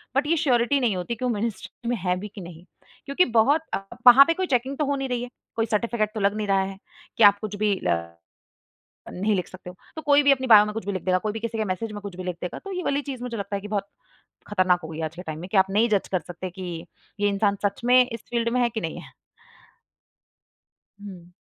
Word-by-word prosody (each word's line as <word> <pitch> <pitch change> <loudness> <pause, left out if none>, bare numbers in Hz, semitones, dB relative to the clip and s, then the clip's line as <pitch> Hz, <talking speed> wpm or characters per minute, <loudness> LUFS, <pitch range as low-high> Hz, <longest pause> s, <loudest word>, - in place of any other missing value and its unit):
But 280 +2 +2
ये 330 - +3
surety 255 -1 +2
नहीं 235 -6 +1
होती 185 +6 -3
कि 255 - -4
वो - - +1
मिनिस्ट्री 215 0 -4
में 245 - +1
है 180 -2 0
भी 210 - -6
कि 205 -1 -11
नहीं? 170 -1 -11 0.4
क्योंकि 280 +6 +2
बहुत 280 +8 +4 0.5
वहाँ 250 +3 +11
पे 330 - +2
कोई 375 +2 -2
चेकिंग 260 0 0
तो 300 - 0
हो 285 0 0
नहीं 270 -1 -3
रही 245 -1 -2
है, 245 - -7 0.3
कोई 225 -1 +1
सर्टिफ़िकेट 220 0 0
तो 220 - -4
लग 200 0 +1
नहीं 210 - -2
रहा 195 -1 +3
है 190 0 -6 0.4
कि 230 - +4
आप 205 0 +7
कुछ 210 -1 -5
भी 205 -1 +1
अ, 85 -1 -1 0.9
नहीं 205 +3 0
लिख 180 -3 -2
सकते 185 0 -11
हो। 180 - -11 0.2
तो 315 - -5
कोई 290 -1 +4
भी 280 - +6
अपने 260 -1 +1
बायो 210 -3 +8
में 210 - -5
कुछ 225 -3 -5
भी 200 - -2
लिख 185 -2 -4
देगा, 185 -1 +2
कोई 210 +3 -2
भी 225 - -4
किसी 230 0 -4
के 220 - 0
मैसेज 210 +3 -3
में 205 -1 -7
कुछ 200 -3 -8
भी 185 - -7
लिख 180 -1 -3
देगा, 180 - -5
तो 395 - -9
ये 365 -1 -3
वाली 285 -2 0
चीज़ 265 -3 -7
मुझे 235 -2 -4
लगता 200 0 -4
है 200 - -3
कि 210 - -7
बहुत 200 -1 -2 0.6
ख़तरनाक 185 -3 +2
होगी 160 0 -6
आज 160 +1 -7
के 180 - -7
टाइम 155 -3 -6
में 180 +3 -8
कि 210 - +2
आप 190 0 +5
नहीं 220 +4 +3
जज 205 -3 +1
कर 185 - +1
सकते 180 +1 -6
कि 175 -2 -7 0.3
ये 205 0 +2
इंसान 200 0 +1
सच 200 - -1
में 250 +1 +6
इस 230 -3 -7
फ़ील्ड 235 -1 0
में 250 - +2
है 240 - +2
कि 220 -2 -4
नहीं 160 - -5
है? - - -14 1.9
हुँ। 180 -4 -11
210 Hz, 265 wpm, -24 LUFS, 185-245 Hz, 1.9 s, वहाँ